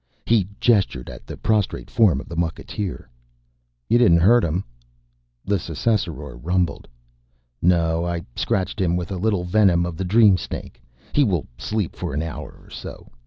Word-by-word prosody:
He 110 -5 +3
gestured 100 - +2
at - - -12
the - - -7
prostrate 105 -4 0
form 100 - +4
of - - -9
the 85 - -7
mucketeer. 85 +2 -3 0.8
"You 120 - +4
didn't 100 -9 +6
hurt 110 +7 +5
him?" 85 +4 -1 0.8
The 100 -1 +1
Ssassaror 85 - -2
rumbled, 90 +1 -1 0.7
"No. 85 -1 +2
I 85 -1 -3
scratched 95 +1 -1
him 85 -2 +2
with 90 0 -3
a 95 - -2
little 100 -1 0
venom 90 -2 +3
of 85 -2 -5
the 95 - -2
dream 100 0 +5
snake. - - -7 0.3
He 145 - +4
will 90 - 0
sleep 105 - -3
for - - -4
an 75 - -1
hour 80 -1 -7
or - - -19
so. - - -9
90 Hz, 165 wpm, -22 LUFS, 85-105 Hz, 0.8 s, didn't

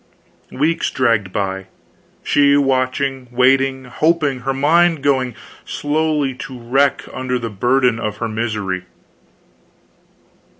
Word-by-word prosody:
Weeks 155 +5 0
dragged 115 -7 +1
by, 95 -1 -3 0.6
she 140 0 +4
watching, 135 -1 0
waiting, 130 +1 +2
hoping, 150 0 0
her 135 +2 -2
mind 160 +3 +3
going 130 -4 +1 0.3
slowly 150 -2 -1
to 130 0 -8
wreck 135 +4 +1
under 130 -1 -2
the 115 -2 -5
burden 120 +3 +2
of 105 0 -3
her 115 - -2
misery. 105 -5 -3
130 Hz, 110 wpm, -18 LUFS, 115-140 Hz, 0.6 s, she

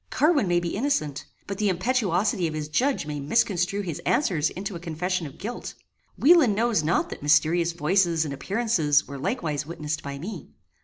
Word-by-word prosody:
Carwin 295 - +2
may 175 0 +3
be 170 -1 -3
innocent, 200 - -1 0.2
but 200 -1 -6
the 210 -1 +2
impetuosity 195 -2 +1
of 155 - -5
his 150 -1 -4
judge 255 - +1
may 150 -1 -4
misconstrue 185 +4 +1
his 170 -7 -5
answers 165 - +1
into 195 +1 -6
a - - -5
confession 175 +1 -2
of 140 - -13
guilt. 230 +5 -6 0.4
Wieland 300 - +5
knows 230 -4 +2
not 155 +3 0
that - - -7
mysterious 160 +3 +3
voices 170 0 +2
and 140 - -4
appearances 165 - +1
were 140 +1 -7
likewise 150 0 -2
witnessed 155 -1 -4
by 140 0 -6
me. 185 +10 -7
175 Hz, 175 wpm, -25 LUFS, 155-205 Hz, 0.4 s, Wieland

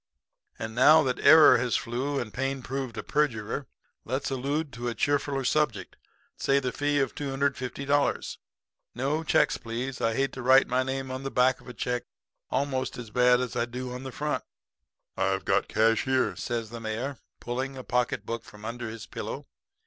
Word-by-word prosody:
And 110 0 -5
now 150 +6 +7
that 130 -2 -1
error 155 -4 +8
has 125 -1 0
flew 135 +4 -1
and 115 -4 -5
pain 135 0 -2
proved 135 -2 -4
a - - -3
perjurer, 130 -3 -1 0.4
let's 135 +4 -2
allude 140 +3 -2
to 120 +1 -3
a 115 - -4
cheerfuller 140 +1 0
subject 150 -7 0 0.4
say 140 0 +2
the 130 -2 -2
fee 145 0 0
of 135 - 0
$250. 140 0 -1 0.6
No 140 +6 -1
checks, 150 -1 +3
please, 120 +3 -5
I 115 0 +1
hate 135 +2 0
to 130 - -6
write 130 +2 +6
my 130 +1 +1
name 130 0 -3
on 130 0 -4
the 135 - -3
back 125 0 +2
of - - -18
a - - -7
check 125 -1 -2 0.4
almost 130 -2 -1
as 115 -3 -8
bad 125 +1 +4
as 125 - -4
I 115 - +1
do 125 +1 -6
on 125 - -6
the 130 0 -6
front.' 150 +3 -2 0.7
"'I've 95 0 0
got - - +2
the - - -15
cash 115 +1 +3
here,' 130 -1 +1
says 115 -2 -3
the 120 - -6
mayor, 115 +5 -4 0.2
pulling 130 +3 -4
a 130 - -6
pocket 125 0 0
book 115 0 -4
from 105 -1 -13
under 120 0 -4
his 110 -1 -8
pillow. - - -6
130 Hz, 185 wpm, -28 LUFS, 120-135 Hz, 0.7 s, error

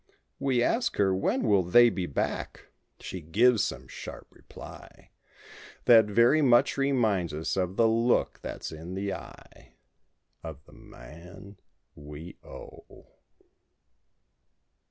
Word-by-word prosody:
We 130 -3 +1
ask 240 - 0
her 95 -2 +2
"When 95 - -1
will 100 -4 +3
they 120 +7 +5
be 90 -2 -3
back?" 70 - -4 0.3
she 95 - -7
gives 110 +9 +3
some - - -5
sharp - - -9
reply - - -14 0.7
That 115 -2 +7
very 120 +9 +4
much 125 -4 +4
reminds 110 - 0
us 80 +1 -3
of 95 -1 -2
the 115 +1 +3
look 115 +2 +1
that's - - -7
in 80 +3 -8
the 100 0 -3
eye— - - -13 0.7
Of 80 -4 -10
the - - -19
man 90 +10 -14 0.4
we 75 +4 -11
owe. - - -14
100 Hz, 120 wpm, -27 LUFS, 85-120 Hz, 0.7 s, That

